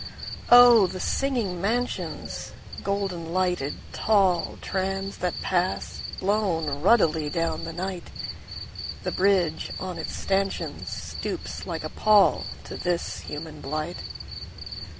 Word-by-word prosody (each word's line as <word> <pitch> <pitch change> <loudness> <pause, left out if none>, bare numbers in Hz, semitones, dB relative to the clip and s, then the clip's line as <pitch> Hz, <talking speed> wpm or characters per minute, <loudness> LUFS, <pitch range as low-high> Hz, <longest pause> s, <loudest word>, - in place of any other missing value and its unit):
Oh, 240 -4 +9
the 185 - -6
singing 230 -8 0
mansions, 240 +5 -2 0.3
Golden 195 -5 -2
lighted 180 -6 +1 0.2
tallTrams 195 0 +1
that 180 -1 -1
pass, 185 0 0 0.2
blown 170 -8 0
ruddily 160 -6 +4
down 165 0 -1
the 165 - -4
night! 180 +1 -4 0.9
The - - -1
bridge 185 -5 +2
on 185 -2 -4
its 155 - -4
stanchionsStoops 195 0 -2
like - - -3
a - - -3
pallTo 215 -2 +3
this 175 -1 -1
human 150 0 -7
blight. 155 +4 -3
185 Hz, 100 wpm, -26 LUFS, 165-200 Hz, 0.9 s, Oh